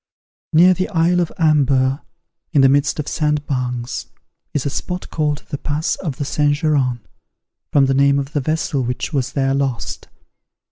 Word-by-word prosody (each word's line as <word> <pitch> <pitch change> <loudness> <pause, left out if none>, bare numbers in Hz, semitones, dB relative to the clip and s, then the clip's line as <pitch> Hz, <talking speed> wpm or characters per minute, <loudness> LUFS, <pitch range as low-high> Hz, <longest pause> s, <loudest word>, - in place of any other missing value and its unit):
Near 175 +4 +6
the 185 +1 -2
isle 175 +1 +2
of 175 -2 0
Amber, 140 -4 +2 0.5
in 145 - +5
the 135 - +6
midst 145 +1 +2
of 150 - -4
sandbanks, 130 -5 -2 0.4
is 145 - -2
a - - +1
spot 180 +5 -5
called 150 -2 -1
The 145 - -4
Pass 150 +2 -1
of 155 -8 -4
the 145 - -3
Saint 145 +1 +1
Geran, 140 -6 0 0.7
from 140 -1 +4
the 135 - +1
name 140 +1 +4
of 140 +1 -3
the 145 - 0
vessel 155 0 -1
which 125 +6 -3
was 130 -2 -1
there 135 -1 +1
lost. 135 -3 -2
145 Hz, 170 wpm, -19 LUFS, 135-155 Hz, 0.7 s, Near